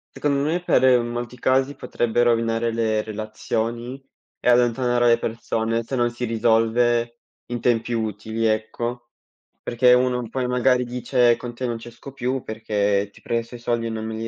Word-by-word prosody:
Secondo 140 -1 0
me 175 +2 0
per 130 -7 +4
molti 120 +1 -5
casi 130 +3 +1
potrebbe 120 -2 0
rovinare 115 -1 +1
le 110 -2 0
relazioni 115 +4 -4 0.4
e - - +1
allontanare 120 0 +3
le 115 0 +4
persone 115 0 -2
se 130 - -4
non 120 -1 +2
si 120 +1 -4
risolve 115 +1 +1 0.3
in 120 -1 -3
tempi 120 0 +1
utili, 110 0 -2
ecco, 120 +2 -2 0.5
perché 125 +1 +4
uno 125 -1 +1
poi 125 +2 -2
magari 125 0 +2
dice: 125 -1 +2
"Con 120 -1 -7
te 125 +1 -4
non 120 -1 -2
ci 115 +1 -10
esco 120 +4 -12
più 130 0 -2
perché 105 -2 -1
ti - - -18
presto 115 +1 -3
i 120 - -8
soldi 120 -1 -1
e - - -2
non 110 -1 -4
me 110 0 -4
li 115 +1 -4
120 Hz, 170 wpm, -23 LUFS, 115-125 Hz, 0.5 s, per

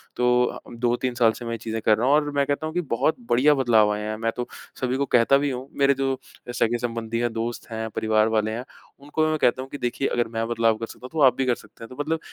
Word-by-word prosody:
तो 125 0 +3
आ - - -7
उम, 120 - -11
2-3 120 +1 0
साल 115 -3 +4
से 120 - -7
मैं 115 0 -3
चीज़ें 115 0 -4
कर 105 0 +4
रहा 120 +3 0
हूँ। 140 - +5
और 150 -1 +2
मैं 140 -1 +2
कहता 145 +3 -1
हूँ 155 - -4
कि 180 - 0
बहुत 155 - +2
बढ़िया 140 +5 +5
बदलाव 115 -5 +4
आए 105 - -4
हैं। 110 +1 -3
मैं 115 0 -1
तो 120 0 -3 0.3
सभी 130 +1 0
को 140 - +1
कहता 125 +3 +4
भी 145 0 0
हूँ, 130 +2 -5
मेरे 140 0 +5
जो 135 0 0 0.3
अ, - - -4
सगे-संबंधी 115 -1 -1
हैं, 120 -1 0
दोस्त 115 +1 -4
हैं, 110 0 -3
परिवार 110 0 +2
वाले 110 -1 +1
हैं, 120 +3 -4 0.4
उनको 150 +2 -1
मैं 155 - 0
कहता 125 +2 +2
हूँ 135 - -8
कि 145 - -6
देखिए 125 +2 -1
अगर 120 -1 0
मैं 115 0 -3
बदलाव 115 -1 +2
कर 115 - -4
सकता - - -13
हूँ, - - -7
तो 160 -2 -1
आप 125 -1 +5
भी 135 - +1
कर 125 -2 +2
सकते - - -15
हैं। 115 - -9
तो 130 - -11
मतलब 160 +1 -1
120 Hz, 280 wpm, -24 LUFS, 115-135 Hz, 0.4 s, हूँ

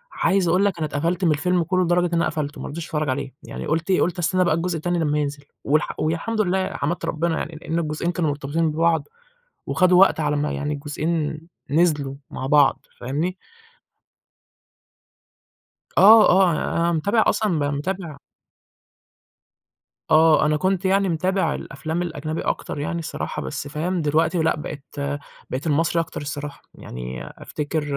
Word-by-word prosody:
عايز 190 -3 +2
أقول 185 +4 +3
لك، 195 -4 0
أنا 155 - -1
اتقفلت 170 +6 -1
من 160 - +4
الفيلم 175 +4 +1
كله 185 +2 +1
لدرجة 175 +1 +2
إن 170 - -7
أنا 170 - +2
قفلته، 150 -2 -3
ما - - -5
رضيتش 160 +3 -6
أتفرّج 150 -3 -2
عليه، 135 0 -3
يعني - - -7
قُلت 165 +4 -1
إيه 185 - +3
قُلت 175 0 0
استنى 185 +2 +2
بقى 165 -3 +2
الجزء 170 +1 -1
التاني 175 +2 -1
لمّا 150 -1 +1
ينزل، 145 -1 -3 0.2
والح 155 +2 0
والحمد 170 +8 0
لله، 190 -1 +1
حمدت 170 +5 -2
ربّنا 165 +1 -1
يعني، 160 - -4
لإن 165 +1 -2
الجزئين 155 +2 -2
كانوا 165 -3 0
مرتبطين 145 +3 -1
ببعض، 165 +1 +1 0.6
وخدوا 185 0 +4
وقت 195 -4 +5
على 150 -1 +1
أمّا 145 +1 -1
يعني 145 +1 -2
الجزئين 150 +2 -2
ن 155 - -6 0.4
نزلوا 145 -6 +1 0.2
مع 130 - -5
بعض، 145 -1 +3
فاهمني؟ 155 +9 -2 2.6
آه، 215 +2 +8
آه. 185 -1 +5
أنا 170 +2 0
متابع 200 +8 +2
أصلًا 215 -1 +1
م 160 - 0 0.2
متابع 170 -2 -4 1.9
آه، 155 -1 +6
أنا 150 0 +2
كنت 190 +3 0
يعني 195 0 +3
متابع 175 0 0
الأفلام 160 +4 -4
الأجنبي 155 -2 -4
أكتر - - -3
يعني 170 +3 -2
الصراحة، 160 - -4
بس، 65 - -5
فاهم؟ 170 +4 -2
دلوقتي 160 +3 +1
لأ 160 - +2
بقيت 150 -1 -7 0.6
بقيت 135 +6 -3
المصري 165 +3 +2
أكتر 165 - -6
الصراحة. 145 0 -6
يعني 60 +1 -7
أفتكر 150 +1 -4
160 Hz, 165 wpm, -23 LUFS, 150-175 Hz, 2.6 s, آه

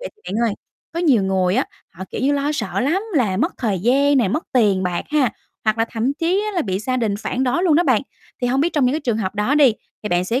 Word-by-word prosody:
vậy - - -5
thì 430 - -31
bạn 230 +2 +1
ơi, 205 - -2 0.4
có 335 - -2
nhiều 275 - +3
người 190 -1 +1
á, 265 - +2 0.3
họ, 185 - -8
kiểu - - -4
như, 275 +3 +2
lo 285 +1 0
sợ 295 - -2
lắm 320 +10 +1
là 215 -9 +2
mất 295 - 0
thời 210 -7 -1
gian 275 +7 +3
này, 230 -7 +2
mất 310 - -2
tiền 205 -7 +3
bạc 180 -2 -2
ha, 295 -5 +2 0.3
hoặc 215 +1 +1
là 225 - +3
thậm 235 +4 0
chí 355 +7 0
á 425 - -3
là 345 - +2
bị 190 -2 -2
gia 255 +4 -2
đình 225 -5 0
phản 255 +4 -2
đối 265 +8 +1
luôn 340 -5 +4
đó 335 - +4
bạn. 260 -9 +2 0.4
Thì - - +2
hông 260 +2 +1
biết 335 +4 +1
trong 290 -4 +2
những 250 - +2
cái 310 - -1
trường 235 -7 -1
hợp 195 -2 -3
đó 210 +7 +1
đi 285 -5 +6 0.3
thì 210 - -3
bạn 175 -1 +1
sẽ 235 +7 0
250 Hz, 290 wpm, -20 LUFS, 210-290 Hz, 0.4 s, đi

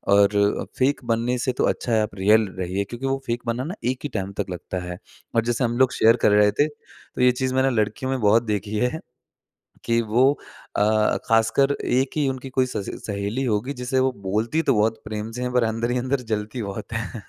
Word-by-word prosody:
और 100 0 +3
फेक 135 +2 +2
बनने 120 +2 0
से 125 +1 0
तो - - +1
अच्छा 120 - -2
है 110 - +4
आप 105 -2 -3
रियल 105 +3 +4
रहिए 95 +2 -1
क्योंकि 120 +6 -7
वो 135 0 +1
फेक 120 +1 -1
बनना 120 +2 -1
ना 175 +7 -5 0.2
एक 130 - -6
ही 145 - -3
टाइम 95 -2 -3
तक 95 - -6
लगता 90 +1 -5
है 90 0 -6 0.4
और 115 - +3
जैसे 120 +2 0
हम 120 0 0
लोग 130 0 +4
शेयर 115 +1 +5
कर 105 - +6
रहे 105 0 +5
थे, 145 +9 +2
तो 150 -3 -11
ये 125 0 +6
चीज़ 130 +1 -2
मैंने 130 +1 +3
लड़कियों 110 +5 -3
में 135 - -1
बहुत 110 +2 +4
देखी 105 -1 -2
है 125 +8 0 0.9
कि 115 0 +2
वो 120 +5 +3 0.5
अ, 110 +1 +3
ख़ासकर 115 +5 +3
एक 130 +2 +2
ही 145 -2 +2
उनकी 130 0 -5
कोई 130 0 +1
स - - -5
स 100 - -4 0.2
सहेली 100 +5 -2
होगी 115 +4 -1
जिसे 130 +1 0
वो 130 0 +2
बोलती 110 +11 0
तो - - +6
बहुत 110 +1 +1
प्रेम 110 0 -4
से 125 +2 -6
हैं 125 - -2
पर 125 -2 +3
अंदर 115 +2 -1
ही 125 - 0
अंदर 130 +2 -1
जलती 110 +3 -2
बहुत 100 +3 -6
हैं। 115 +1 -4
115 Hz, 225 wpm, -23 LUFS, 105-130 Hz, 0.9 s, कर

